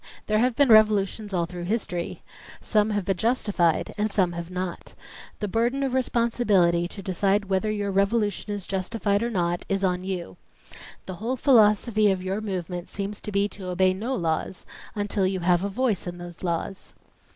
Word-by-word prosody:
There 215 0 +1
have 250 0 +2
been 285 -1 +4
revolutions 215 -1 +4
all 175 -3 0
through 175 0 -7
his 215 +4 0
tory. 175 -1 -5 0.4
Some 210 -1 +1
have 205 -3 -1
been 195 -1 0
justified 205 -7 +1
and 215 0 0
some 185 -3 +2
have 170 0 -6
not. 180 -1 -5 0.5
The 210 - -1
burden 240 +7 0
of 265 -2 -1
responsibility 225 -9 +2
to 195 +2 -9
decide 195 +2 +1
whether 190 +3 +1
your 205 -1 -1
revolution 205 +1 0
is 205 -2 -4
justified 200 +1 -1
or 235 - 0
not 175 -5 -1
is 195 0 0
on 180 -1 0
you. 180 - -5 0.7
The 185 -2 -7
whole 235 +6 -2
philosophy 215 -4 +4
of 190 -1 -1
your 190 +3 -2
movement 180 -3 -4
seems 200 +1 -4
to 210 - -6
be 200 0 +2
to 190 -3 -8
obey 185 +1 +2
no 230 +8 -3
laws 165 0 -2 0.3
until 205 -2 0
you 190 -1 -2
have 175 +1 +2
a 200 - -1
voice 220 -4 -1
in 175 0 -5
those 175 -1 -10
laws." 175 +2 -4
195 Hz, 185 wpm, -25 LUFS, 180-215 Hz, 0.7 s, been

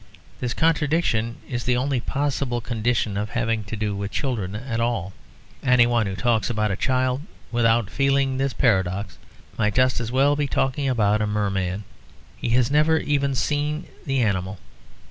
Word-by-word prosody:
This 125 -1 -2
contradiction 150 -8 +1
is 120 -2 -3
the 125 -1 +2
only 135 0 0
possible 140 -1 -1
condition 115 -3 -1
of 105 +1 -2
having 115 -2 -1
to 105 - -5
do 105 -1 -2
with 100 0 -3
children 105 -7 -2
at 115 +1 -3
all; 115 -6 -1 0.5
anyone 120 -3 +4
who 95 - -3
talks 110 +3 +1
about 105 -3 0
a - - 0
child 130 +3 0 0.3
without 115 -3 +2
feeling 135 -1 +1
this 135 0 +1
paradox 95 -5 0 0.4
might 105 -2 +1
just 130 -1 +3
as 115 -1 -4
well 140 +3 +3
be 145 -1 0
talking 135 +1 0
about 105 -4 +2
a 105 - +1
merman. 100 -2 -1 0.5
He - - -4
has 120 +1 +2
never 155 +2 +4
even 140 -2 0
seen 150 +3 -1 0.2
the 135 -3 0
animal. 95 -2 -1
120 Hz, 165 wpm, -23 LUFS, 105-135 Hz, 0.5 s, anyone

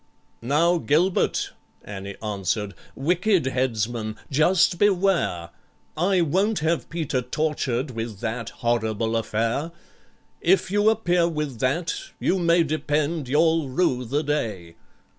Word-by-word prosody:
"Now, 165 +8 +2
GILBERT," 170 +5 +1 0.3
ANNIE 100 -1 -7
answered, 105 0 -2 0.2
"wicked 180 +4 +1
headsman, 120 -4 -1 0.2
just 175 +4 +3
beware— 185 - +1 0.4
I 180 +3 +2
won't 190 +7 +1
have 160 +1 0
PETER 155 -6 -1
tortured 135 -1 -1
with 115 -3 -5
that 115 +1 -3
horrible 115 -1 -1
affair; 115 +7 -1 0.7
If 185 +1 +2
you 205 +1 +4
appear 180 -6 +2
with 150 -7 -3
that, 165 +7 0 0.3
you 190 - +1
may 170 0 +4
depend 150 -1 -1
you'll 160 0 +2
rue 130 -3 +1
the 140 +6 -1
day." 110 - -3
145 Hz, 115 wpm, -24 LUFS, 115-170 Hz, 0.7 s, you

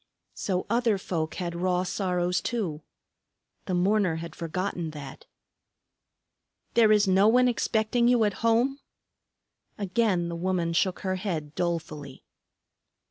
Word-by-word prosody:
So 185 -2 -2
other 230 -1 +2
folk 165 -4 -3
had 175 -2 -3
raw 180 +1 0
sorrows, 180 -1 -1
too. 185 -11 -3 0.9
The 185 - 0
mourner 190 -1 +2
had 165 +1 -7
forgotten 170 0 -3
that. 140 -3 -10 1.5
"There 225 -2 +5
is 210 -1 +4
no 190 +2 +5
one 250 +3 +5
expecting 235 0 +1
you 245 -2 +4
at 205 -2 +1
home?" 235 +5 +2 1.0
Again 195 -3 +1
the 170 - -4
woman 175 -1 -1
shook 185 +2 +1
her 185 -1 -1
head 160 -6 -4
dolefully. 155 -6 -4
185 Hz, 125 wpm, -27 LUFS, 170-215 Hz, 1.5 s, There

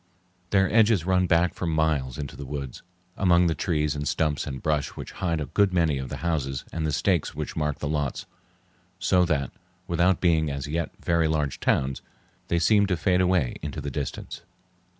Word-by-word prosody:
Their 95 -2 +3
edges 110 -6 +4
run 90 -1 +2
back 85 +1 +3
for 90 - -4
miles 80 -5 0
into 70 -2 -6
the - - -7
woods 70 -2 -6 0.3
among 90 -2 +4
the 85 - +2
trees 75 -4 0
and 75 -1 -3
stumps 75 -1 0
and 65 -2 -5
brush 75 -1 0
which - - -7
hide 85 -3 -2
a 75 - -2
good 100 +3 +2
many 80 -6 +2
of 65 -1 -5
the - - -5
houses 70 -6 -1
and 80 -1 -1
the - - 0
stakes 85 +1 0
which - - -5
mark 75 -2 -1
the 75 - -4
lots; 75 -2 -2 0.7
so 90 -1 +3
that, 70 -6 0 0.3
without 85 +1 +2
being 80 -4 +2
as 70 0 -4
yet 85 +3 -2 0.2
very 85 -1 +3
large 75 -3 -1
towns, 65 0 0 0.5
they 85 - +1
seem 100 +4 +4
to 90 -3 0
fade 90 +1 +2
away 90 -8 +1
into 75 0 -5
the 70 -1 -4
distance. 75 -4 -5
80 Hz, 190 wpm, -26 LUFS, 75-90 Hz, 0.7 s, edges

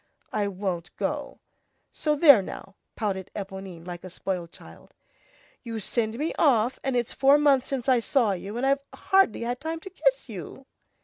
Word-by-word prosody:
"I 205 -1 +1
won't 185 -3 -4
go, - - -3 0.5
so 300 -1 0
there 285 -7 +8
now," 195 +1 -8 0.2
pouted 195 -4 -3
Éponine 190 -4 -7
like 175 -1 -7
a 185 - -8
spoiled 180 -1 -4
child; - - -15 0.7
"you 230 -2 -5
send 220 +1 -2
me 305 +4 -1
off, 250 -5 +3
and 270 -2 -1
it's 240 -2 -1
four 275 +1 +5
months 280 -3 +3
since 265 -3 -3
I 255 -2 +5
saw 235 -2 +2
you, 195 +4 -5
and 255 - 0
I've 275 +1 +2
hardly 385 - +3
had 245 +1 -2
time 320 +1 -3
to 385 - -9
kiss - - +1
you." - - -9
235 Hz, 175 wpm, -26 LUFS, 195-275 Hz, 0.7 s, there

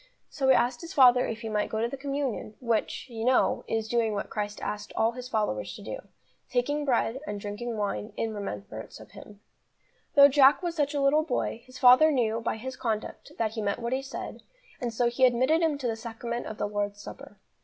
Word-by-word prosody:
So 270 -2 -1
he 265 - +7
asked 245 0 +1
his 335 - -8
father 250 -2 +6
if 225 -1 -5
he 225 - -5
might 210 -1 -1
go 220 - -2
to 230 - +1
the 245 - -5
communion, 275 -5 -3
which, 235 0 -1
you 225 -3 -6
know, 255 +2 +2
is 225 -1 -1
doing 230 -2 +1
what 200 - -4
Christ 210 -1 -3
asked 210 0 -5
all 225 +1 +2
His 250 +1 -8
followers 105 - -1
to - - -11
do, - - -5 0.5
taking 290 +4 0
bread 250 -1 +1
and 205 - -4
drinking 215 +3 -5
wine 200 - -3
"in 225 -1 -2
remembrance 110 - -7
of 110 - -14
Him." 205 -1 -13 0.7
Though 280 -1 +10
Jack 280 +3 +5
was 345 -1 -1
such 290 -2 0
a 285 - +1
little 280 +3 +4
boy, 250 -6 -2
his 255 0 -12
father 255 +6 +7
knew, 230 -4 0
by 225 - -2
his 260 +4 -6
conduct, 220 -3 -4
that 220 -2 0
he 220 0 -4
meant 200 -1 -1
what 235 +1 -3
he 265 - 0
said, 270 - -7 0.4
and 240 -2 -2
so 240 +2 +1
he 240 +2 -1
admitted 255 +6 +4
him 320 -3 +1
to 275 - -7
the 230 -2 0
Sacrament 235 +1 -5
of 215 - -7
the - - -1
Lord's 205 0 -3
Supper. 205 0 -11
235 Hz, 220 wpm, -28 LUFS, 215-260 Hz, 0.7 s, Though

